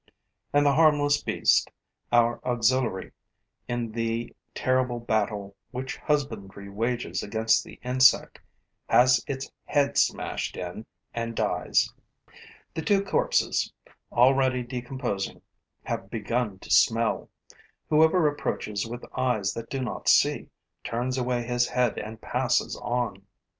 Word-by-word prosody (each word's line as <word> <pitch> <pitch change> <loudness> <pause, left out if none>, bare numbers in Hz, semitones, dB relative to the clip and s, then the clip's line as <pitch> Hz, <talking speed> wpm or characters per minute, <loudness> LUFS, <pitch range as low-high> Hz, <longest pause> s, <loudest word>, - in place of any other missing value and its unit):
And 145 0 +3
the 140 - +5
harmless 145 -1 +4
beast, - - +2 0.4
our 120 0 +3
auxiliary 120 -4 0 0.6
in 120 -2 -2
the 115 +1 -3 0.2
terrible 130 -1 +1
battle 105 -3 -1
which 130 +2 -5
husbandry 105 -9 -3
wages 115 +4 -2
against 110 +2 +1
the - - -13
insect, 130 +2 +4 0.5
has 125 +1 +5
its 135 -1 -4
head 140 -1 +2
smashed - - -1
in 90 +5 -6 0.3
and 115 0 -3
dies. - - +1 0.8
The 160 - -3
two 195 +4 +2
corpses, - - +1 0.4
already 130 0 +3
decomposing, 120 -4 -4 0.4
have 95 - -4
begun 115 -1 -2
to - - -11
smell. 115 0 +3 0.6
Whoever 160 +2 +4
approaches 110 -7 -2
with 120 +1 -7
eyes 110 -7 0
that 115 0 -7
do 135 - -3
not 120 - -2
see - - +3 0.3
turns 125 +3 -2
away 125 -1 0
his 120 0 +1
head 125 -4 0
and 110 +1 -7
passes 125 +2 0
on. 120 -5 -3
120 Hz, 120 wpm, -26 LUFS, 110-130 Hz, 0.8 s, the